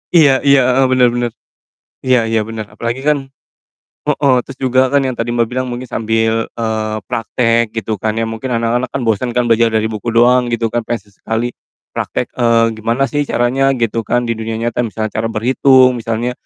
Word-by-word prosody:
Iya 140 -5 +5
iya, 140 -1 +5
heeh, 135 +1 +3
bener 130 -1 +4
bener, 120 -1 -1 0.7
iya 130 -1 +3
iya 115 0 +1
bener 110 0 -5
apalagi 115 +3 -3
kan 150 -1 +3 0.9
heeh, 140 -2 +2
terus 135 - -8
juga 130 0 +3
kan 140 +1 +2
yang 130 - -1
tadi 115 - -1
Mbak 115 -1 +2
bilang 130 +1 -2
mungkin 125 0 -5
sambil, 115 0 0
eee, 110 -2 -2
praktek 115 +2 0
gitu 110 -2 -3
kan 110 +1 -1
ya 115 - 0
mungkin 115 +3 -4
anak-anak 115 +2 0
kan 135 +2 -4
bosen 115 +2 0
kan 125 - +3
belajar 115 0 +3
dari 110 0 0
buku 110 +2 -6
doang 125 +1 +4
gitu 115 -1 -1
kan 120 - 0
pengen 120 - -2
sesekali, 115 +4 -3 0.4
praktek, - - -3
eee, 115 -2 +3
gimana 115 +5 0
sih 145 -1 -1
caranya 135 +3 +1
gitu 115 -2 -2
kan 120 0 +1
di 115 - -2
dunia 110 0 -3
nyata 115 +2 -3
misalnya 110 0 -4
cara 110 +1 -2
berhitung 125 +2 +3
misalnya, 115 +1 -2
115 Hz, 190 wpm, -16 LUFS, 115-125 Hz, 0.9 s, Iya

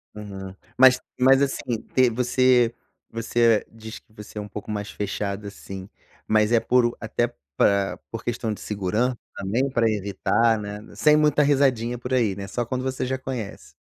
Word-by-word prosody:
Uhum. 95 -2 -8 0.2
Mas 130 -1 +7 0.2
mas, 135 +2 +5
assim, 130 -4 -1
te 130 -1 +5
você 125 0 +3 0.4
você 115 -1 +2
diz 110 0 -9
que - - -34
você 105 0 -11
é - - -2
um 105 - -7
pouco 105 0 -8
mais 105 -1 -3
fechada, 100 0 -4
assim, 95 -1 -9 0.4
mas 110 0 +3
é 120 - +5
por 125 +1 +3
o 120 - -2
até 120 +2 -1 0.2
pra 100 +2 +2
por 115 0 -6
questão 115 -2 -2
de - - -10
seguran 105 +5 -1 0.2
também? 115 +8 -1
Pra 120 -3 +2
evitar, 110 +2 +1
né. 105 0 -6 0.2
Sem 150 0 +5
muita 150 -1 +3
risadinha 130 -4 +2
por 125 +2 -5
aí, 115 -6 +2
né. 100 0 -6
Só 120 +3 -2
quando 130 +2 -3
você 130 0 -2
já 130 +1 -1
conhece. 130 -6 -6
115 Hz, 180 wpm, -24 LUFS, 105-125 Hz, 0.4 s, Mas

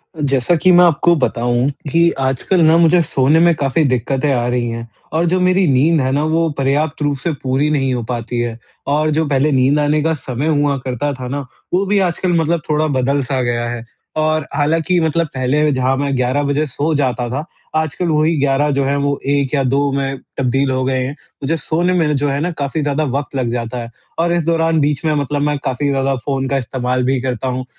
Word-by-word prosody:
जैसा 140 +1 +1
कि 175 +3 +3
मैं 175 0 +7
आपको 170 +1 +3
बताऊँ 120 -3 0 0.2
कि 170 +2 +4
आजकल 135 +7 +1
ना 160 +1 +5
मुझे 170 +1 +5
सोने 145 0 +2
में 170 0 +5
काफ़ी 145 +2 +1
दिक्कतें 130 +3 0
आ 120 -1 0
रही 120 -1 0
हैं 115 0 -5 0.3
और 165 +2 +1
जो 185 +2 +1
मेरी 185 0 +3
नींद 150 +5 +3
है 130 0 0
ना, 145 +2 +1
वो 165 +1 +1
पर्याप्त 140 +3 0
रूप 145 -1 0
से 160 +5 -2
पूरी 135 +3 +1
नहीं 135 -3 +1
हो 120 -1 -2
पाती 120 0 -4
है 120 -1 -2 0.4
और 155 +1 +1
जो 160 +1 +1
पहले 140 +1 +1
नींद 135 +2 +3
आने 150 +1 +1
का 160 +1 +1
समय 135 -1 -4
हुआ 145 -1 +1
करता 130 +3 -2
था 130 -1 -7
ना, 140 +2 -4 0.3
वो 190 +2 +2
भी 200 +1 +2
आजकल 175 +1 -1
मतलब 165 +1 0
थोड़ा 155 +1 +1
बदल-सा 135 -1 0
गया 120 -1 -1
है। 120 -1 -5 0.3
और 155 -1 +1
हालाँकि, 165 +4 +1
मतलब 165 0 0
पहले 140 +4 +1
जहाँ 130 0 +1
मैं 140 0 -1
11 130 +3 0
बजे 145 +2 0
सो 150 +3 -2
जाता 125 -4 0
था, 140 +6 -3 0.3
आजकल 160 +3 -2
वही 155 +1 +2
11 140 +1 +2
जो 140 -1 0
है, 140 +1 0
वो 140 0 -1
1 140 -1 0
या 140 -2 +2
2 140 +2 +1
में 135 0 -2 0.2
तब्दील 135 +1 +1
हो 130 0 0
गए 130 -1 0
हैं। 135 +3 -4 0.3
मुझे 160 +4 0
सोने 170 +4 0
में 160 -4 +1
जो 145 +1 0
है 140 +1 -1
ना, 175 +4 -1
काफ़ी 150 -1 -3
ज़्यादा 145 +1 0
वक़्त 140 0 -3
लग 125 -3 -1
जाता 120 0 -3
है 115 - -7 0.3
और 170 +1 +2
इस 170 -1 +1
दौरान 165 -1 +2
बीच 145 0 0
में 155 - +2
मतलब 145 0 -1
मैं 145 0 0
काफ़ी 135 +3 -1
ज़्यादा 135 0 0
फ़ोन 135 -2 -1
का 140 - +1
इस्तेमाल 125 0 -2
भी 130 0 +1
करता 130 0 -3
हूँ, 130 0 -3
140 Hz, 220 wpm, -17 LUFS, 130-155 Hz, 0.4 s, मैं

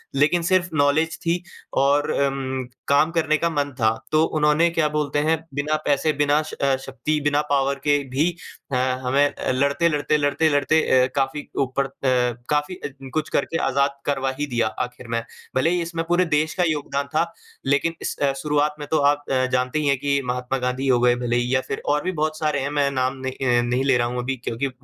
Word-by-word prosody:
लेकिन 150 +5 +3
सिर्फ़ 185 +1 +2
नॉलेज 150 +3 +2
थी 170 +1 +1 0.4
और 140 +2 +3
अम, 135 -1 -1 0.2
काम 150 +3 +3
करने 155 -2 +2
का 170 +1 0
मन 145 -2 -1
था। 110 - +2 0.3
तो 155 +1 +4
उन्होंने 155 +2 +2
क्या 165 -2 +1
बोलते 150 -1 -1
हैं, 160 +2 +2 0.2
बिना 145 +2 0
पैसे, 145 +2 +2
बिना 145 +1 +2
श 155 - -9
अ, 140 -1 +1
शक्ति, 150 +3 -2
बिना 145 0 +2
पॉवर 140 0 +2
के 145 -1 +3
भी 145 +7 +1 0.4
अ, - - 0 0.3
हमें 135 +3 +3
अ, - - -2
लड़ते, 140 +6 +2
लड़ते, 150 0 +1
लड़ते, 145 +2 +2
लड़ते 145 +2 +3 0.2
अ, - - -2
काफ़ी 140 +2 -1 0.2
ऊपर 135 +1 -1
अ, - - -7 0.6
काफ़ी 150 +4 0
अ, - - -6 0.2
कुछ 155 -1 -1
करके 165 - 0
आज़ाद 140 +1 +2
करवा 135 -2 0
ही 145 - 0
दिया 120 -3 0 0.2
आखिर 125 0 -9
में। 115 0 -1 0.3
भले 130 +5 +3
ही 175 0 +1
इसमें 165 0 -3
पूरे 175 +1 +3
देश 155 -1 +1
का 180 - +2
योगदान 140 -2 -2
था, 165 +2 +1 0.3
लेकिन 140 +5 +1
इस - - -3
अ, 140 -1 +2
शुरुआत 150 0 +1
में 145 - -6
तो 155 - +3
आप 145 0 -3
अ, 130 -1 +2
जानते 125 +4 0
ही 150 - 0
हैं 140 -1 +3
कि 140 0 0
महात्मा 125 +1 -2
गाँधी 125 +2 -2
हो 125 -2 +4
गए, 120 0 +4
भले 120 -1 -1
ही 120 +1 0
या 130 - +2
फिर 135 - -4
और 150 +1 +1
भी 185 - -1
बहुत 155 0 -1
सारे 150 -2 0
हैं, 135 - -2
मैं 145 -1 +1
नाम 130 0 -1
न - - 0
अ, - - -5 0.3
नहीं 125 +2 0
ले 135 -2 +3
रहा 120 - +1
हूँ 125 +1 -3
अभी 135 +2 -2
क्योंकि 130 +4 -1
145 Hz, 215 wpm, -23 LUFS, 135-155 Hz, 0.6 s, तो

